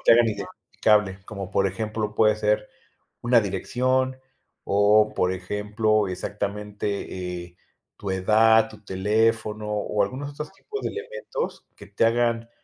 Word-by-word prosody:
te - - +6
hagan 120 0 +5
identificable, 105 -1 0
como 100 -3 -6
por 100 0 +2
ejemplo, 105 +2 -3
puede 110 -1 +4
ser 105 0 0 0.5
una 120 0 +5
dirección 130 +6 0 0.5
o 105 +1 +4
por 90 - +2
ejemplo, 105 +3 0
exactamente, 100 -2 -4
eh, 85 0 -19 0.4
tu 100 -2 -4
edad, 110 +4 +4
tu 105 -1 -15
teléfono 105 +2 0
o 105 0 0
algunos 135 +8 -4
otros 150 +1 -7
tipos 420 - -7
de - - -2
elementos - - -5
que - - -11
te - - +1
hagan 115 0 +1
105 Hz, 135 wpm, -25 LUFS, 100-115 Hz, 0.5 s, te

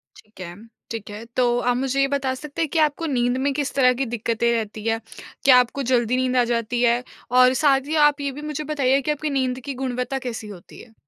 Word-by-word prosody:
ठीक 215 -1 -19
है। 175 -1 -7 0.4
ठीक 225 -3 -6
है, 210 +2 -8
तो 240 +1 0
आप 245 0 +1
मुझे 270 +1 -1
ये 275 - +3
बता 275 -2 -1
सकते 300 +3 -6
हैं 325 - 0
कि 330 - +2
आपको 305 +1 +1
नींद 245 -4 0
में 275 +2 0
किस 280 0 -2
तरह 255 -2 +4
की 265 +2 -2
दिक्कतें 235 +1 0
रहती 215 -2 -3
हैं? 225 0 +1 0.5
क्या 260 -2 +8
आपको 250 +3 -1
जल्दी 245 0 +2
नींद 255 0 0
आ 245 - +5
जाती 235 +1 -1
है 240 0 +2 0.3
और 255 0 +6
साथ 275 -2 +3
ही 310 - -2
आप 290 0 -7
ये 280 -1 -2
भी 285 +3 -9
मुझे 300 +1 -4
बताइए 275 -1 +2
कि 300 - -1
आपकी 300 +1 -3
नींद 255 -1 -1
की 280 - -4
गुणवत्ता 250 +1 -2
कैसी 225 -2 -5
होती 195 -4 -12
है? 230 - -17
255 Hz, 240 wpm, -22 LUFS, 235-275 Hz, 0.5 s, क्या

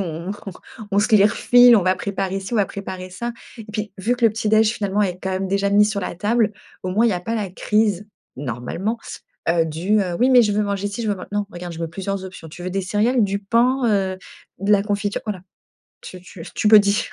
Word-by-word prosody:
on 170 0 -4
on 205 -1 -7 0.4
on 200 - +2
se 215 +2 +3
les 205 - +7
refile, 245 +3 +6
on 200 - +2
va 185 0 +3
préparer 195 0 -3
si 190 +4 -8
on 235 - +1
va 205 - +2
préparer 185 -2 -7
ça. 235 +6 -4 0.3
Et 225 - -9
puis, 210 -2 -4
vu 235 +6 0
que 240 - -1
le 225 - +6
petit 215 -1 -2
déj, 220 0 +4
finalement 205 -2 -1
est 185 -2 -1
quand 190 - -2
même 190 +1 -2
déjà 200 +1 0
mis 205 +1 +5
sur 210 -1 -1
la 180 - -5
table, 215 +3 +1 0.3
au 185 - -3
moins 220 +5 +3
il - - +3
y - - 0
a 180 - -2
pas 225 +5 -3
la 205 -4 -3
crise, 210 0 0 0.3
normalement, 140 - -4 0.5
heu, 165 -1 +3
du, 175 +7 0
heu, 180 -3 -2
oui, 250 - +4
mais 250 -2 +7
je 210 - +1
veux 210 +1 +1
manger 200 0 -2
si, 205 +3 -5
je 220 - -2
veux 205 - +1
man 185 - -9
non, 205 0 -1
regarde, 175 0 -7
je 165 - -9
mets 165 - -1
plusieurs 195 +2 -4
options, 180 -3 -10
tu 175 +3 -11
veux 185 - -3
des 195 +1 -2
céréales, 220 +6 +1
du 200 -1 0
pain, 235 +6 +1
heu, 190 -3 0 0.4
de 200 +3 +1
la 200 -1 +4
confiture, 205 0 -2
voilà, 200 -4 -4 0.6
tu 185 - -10
tu 180 -2 -11
tu 210 - +1
me 215 - +10
dis. 205 0 +1
200 Hz, 255 wpm, -21 LUFS, 185-215 Hz, 0.6 s, me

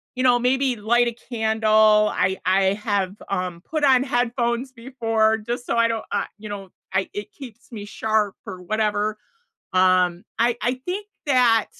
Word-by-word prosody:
you 255 - -1
know, 245 -1 +4
maybe 260 +1 +1
light 240 +3 +2
a 235 - -3 0.2
candle. 215 -1 +3
I 190 +1 0
I 190 +1 +3
have, 200 -2 -2
um, 180 -3 -3
put 310 +5 -4
on 260 -2 +5
headphones 245 0 -1
before, 225 -3 0
just 240 +3 -5
so 230 - 0
I 230 0 +4
don't, 225 -1 -3
uh, - - 0
you 215 -1 -8
know, 195 -2 -7 0.2
I 190 - 0
it 205 - -6
keeps 245 -4 -13
me 205 -3 -7
sharp 215 -1 0
or 180 -1 -8
whatever 215 +1 -1 0.5
um, 185 -1 +3 0.2
I 235 +1 +2
I 245 +3 +1
think 395 +3 -4 0.2
that 245 -5 +4
220 Hz, 170 wpm, -23 LUFS, 205-245 Hz, 0.5 s, on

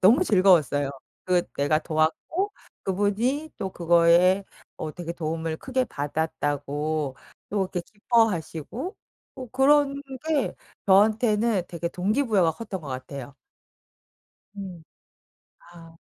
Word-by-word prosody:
너무 245 - +6
즐거웠어요. 170 - +4 0.3
그 180 -1 +3
내가 145 +2 +2
도왔고 160 - 0 0.3
그분이 215 +10 0
또 190 - -3
그거에 175 +3 +4 0.3
어 155 - -5
되게 170 0 -5
도움을 160 -1 -3
크게 260 +6 -1
받았다고 145 - -2 0.3
또 210 - -4
이렇게 185 -1 -1
기뻐하시고 220 - -1 0.4
어 255 -1 -6
그런 280 +2 +4 0.3
게 310 -4 +1 0.3
저한테는 215 +1 +4
되게 170 0 -3
동기부여가 200 - +1
컸던 195 +1 -6
것 150 - -9
같아요. 135 +1 -7 1.2
음. 185 -5 -8 0.9
아. 165 -1 -14
180 Hz, 240 characters per minute, -25 LUFS, 160-225 Hz, 1.2 s, 너무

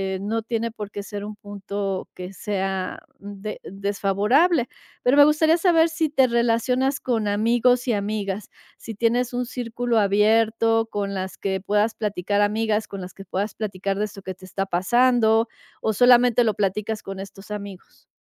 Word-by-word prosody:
eh, - - -5
no 220 +3 -1
tiene 230 0 -2
por 210 -2 -7
qué 205 - -6
ser 205 0 -6
un 210 0 -7
punto 200 -1 -5
que 180 +1 -8
sea 190 -2 -3 0.2
de 205 +1 -7
desfavorable, 205 - +1 0.4
pero 250 +2 +4
me 290 - +10
gustaría 315 +2 +4
saber 335 -2 +4
si 325 -1 -1
te 270 -3 +3
relacionas 245 +3 +1
con 225 -4 -1
amigos 240 +4 +2
y 240 - +2
amigas, 205 -1 -3 0.3
si 225 - -8
tienes 235 +3 +1
un 245 0 -1
círculo 240 -1 -1
abierto 225 +2 +3
con 200 -1 -2
las 190 -1 -5
que 190 -1 -2
puedas 210 +3 +1
platicar, 205 -1 -1
amigas, 215 +1 +1
con 195 -1 -7
las 180 0 -8
que 195 - -11
puedas 200 +3 -3
platicar 195 -2 -3
de 210 - +1
esto 200 -2 -10
que 190 - -5
te 185 - -14
está 195 +1 -3
pasando 225 +4 +3 0.3
o 220 - 0
solamente 245 +1 +5
lo 220 -3 +1
platicas 210 +2 -2
con 195 0 -7
estos 195 +1 -10
amigos. 200 -3 -9
215 Hz, 170 wpm, -23 LUFS, 200-240 Hz, 0.4 s, me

